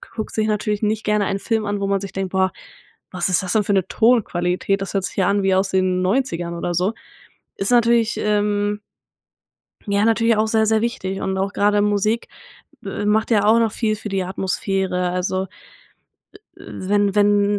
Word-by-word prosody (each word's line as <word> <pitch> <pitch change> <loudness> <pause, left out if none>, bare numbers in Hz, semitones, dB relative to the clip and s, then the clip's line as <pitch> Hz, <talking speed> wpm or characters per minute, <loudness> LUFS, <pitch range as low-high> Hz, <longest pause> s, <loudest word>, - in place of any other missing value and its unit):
guckt 220 -2 -5
sich 215 0 +1
natürlich 210 0 -1
nicht 215 +1 0
gerne 210 -1 +1
einen 195 - -2
Film 220 0 -1
an, 205 0 -2
wo 195 - 0
man 195 0 +1
sich 195 -2 -6
denkt: 195 -1 -3
„Boah, 190 0 +2 0.6
was 180 0 -1
ist 185 - +2
das 180 - -2
denn 215 - +3
für 205 - +1
'ne 190 -3 +1
Tonqualität? 195 -4 +1
Das 195 - -5
hört 195 -1 0
sich 180 - -7
ja 190 -1 +2
an 200 0 +1
wie 190 -1 +2
aus 190 +1 +1
den 185 -1 +1
90ern 185 -5 -1
oder 175 +1 -3
so“. 185 +5 +1 0.6
Ist 200 +5 -1
natürlich, 235 -1 +3
ähm 205 0 0 1.1
ja, 200 +1 +2
natürlich 230 0 +3
auch 220 0 +2
sehr, 220 0 +2
sehr 220 0 +2
wichtig. 210 -5 -3
Und 190 0 -2
auch 195 +1 -2
grade 205 0 +2
Musik, 210 +2 0 0.6
äh, 200 +1 -4
macht 220 +3 +1
ja 205 -2 +3
auch 225 +2 +5
noch 225 -2 +1
viel 220 -2 -1
für 215 0 -7
die 190 -1 -1
Atmosphäre. 190 -1 -2
Also, 185 +1 -1 1.1
äh - - -15
äh, - - -12 0.2
wenn 205 -1 +2
wenn 205 0 +4
205 Hz, 200 wpm, -21 LUFS, 190-215 Hz, 1.1 s, auch